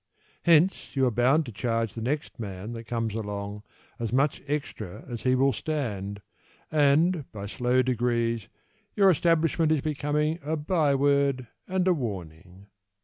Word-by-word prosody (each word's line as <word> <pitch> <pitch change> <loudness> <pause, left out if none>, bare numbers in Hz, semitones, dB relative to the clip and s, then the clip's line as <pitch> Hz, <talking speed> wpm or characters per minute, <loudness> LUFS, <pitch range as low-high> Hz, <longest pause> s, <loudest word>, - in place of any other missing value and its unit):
Hence 170 +1 +3
You 135 -1 +3
are 125 - +2
bound 130 +7 +3
to 120 - -7
charge 115 +1 -1
The 115 - -6
next 145 +5 -3
man 100 0 -6
that 115 0 -7
comes 115 -2 -2
along 105 -1 -4 0.4
As 115 -2 -2
much 135 +3 +1
extra 140 -10 -4
as 120 -3 -6
he 130 0 +2
will 135 +1 +3
stand, 100 -10 -3 0.5
And 155 +2 +3
by 100 -2 -6
slow 125 +4 +1
degrees 115 -3 0 0.5
Your 195 -2 +6
establishment 165 -1 +2
Is 155 -3 +2
becoming 150 +2 -1
A 155 +3 -2
by 150 -2 +2
word 140 -3 +2 0.2
And 185 0 0
a 185 - +5
warning. 95 - -6
130 Hz, 150 wpm, -27 LUFS, 110-150 Hz, 0.5 s, Your